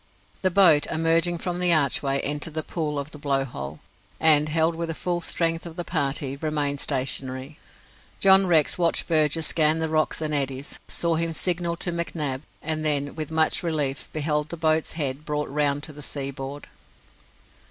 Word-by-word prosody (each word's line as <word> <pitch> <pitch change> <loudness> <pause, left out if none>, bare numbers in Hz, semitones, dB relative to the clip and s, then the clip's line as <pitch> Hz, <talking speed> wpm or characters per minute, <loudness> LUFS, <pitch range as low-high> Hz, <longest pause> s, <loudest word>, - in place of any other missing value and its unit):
The 185 - +3
boat, 170 -5 +5
emerging 165 +2 +1
from 175 +1 -3
the 180 -1 +4
archway, 140 -3 +2
entered 150 +2 -1
the 155 - -2
pool 155 -3 -3
of 140 +2 -4
the 150 - -10
Blow 140 -2 0
hole, 70 - -7 0.4
and, 155 -1 +5
held 160 +1 +2
with 165 +1 -4
the 165 - -3
full 175 0 -2
strength 165 0 0
of 165 - -10
the 175 - -4
party, 140 -4 -1
remained 145 -2 -2
stationary. 130 +2 -2 0.6
John 195 0 +6
Rex 160 -1 +3
watched 170 -1 +2
Burgess 155 -1 +2
scan 155 -1 +3
the 160 0 -1
rocks 155 0 0
and 155 -1 -3
eddies, 135 -1 -2
saw 170 -1 0
him 165 0 -1
signal 170 0 0
to 175 - -2
McNab, 155 -6 -3 0.2
and 155 0 -1
then, 145 -2 0
with 155 -2 -5
much 160 0 +1
relief, 150 -4 -1
beheld 150 0 -1
the 170 - -6
boat's 160 0 +1
head 145 -3 -2
brought 150 -1 -3
round 145 0 0
to 155 - -7
the 150 - -11
sea 140 -1 -3
board. 135 +1 -7
155 Hz, 180 wpm, -24 LUFS, 145-165 Hz, 0.6 s, John